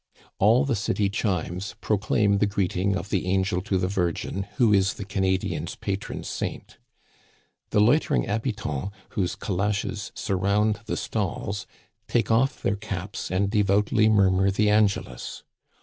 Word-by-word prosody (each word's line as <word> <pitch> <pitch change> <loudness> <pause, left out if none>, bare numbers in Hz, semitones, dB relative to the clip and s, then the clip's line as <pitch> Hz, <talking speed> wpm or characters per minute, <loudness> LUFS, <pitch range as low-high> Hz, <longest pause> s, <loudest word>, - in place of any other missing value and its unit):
All 115 +8 +5
the 135 -4 +1
city 100 -1 0
chimes 95 -2 -2
proclaim 100 -1 +1
the 105 - +3
greeting 100 -1 0
of 95 +2 -4
the 95 -3 -1
angel 95 0 +1
to 100 -1 0
the 90 0 0
Virgin, 95 +1 -2
who 120 -5 +4
is 95 -1 +3
the 100 - -6
Canadian's 95 -1 -1
pa - - -4
tron - - -7
saint. - - -5 0.9
The - - +2
loitering 145 +6 +3
habitants^ 105 - -2 0.2
whose 95 -3 -1
calashes 105 +2 -2
sur 95 - -1
round 105 +3 +2
the - - -2
stalls, 100 0 -3 0.4
take 115 -1 +1
off 120 +4 +2
their 100 - +1
caps 100 -2 -5
and 95 +2 0
devoutly 105 +1 +3
mur 100 -3 +5
mur 95 +1 +3
the 105 +2 +2
Angelus. 100 - 0
100 Hz, 150 wpm, -25 LUFS, 95-105 Hz, 0.9 s, All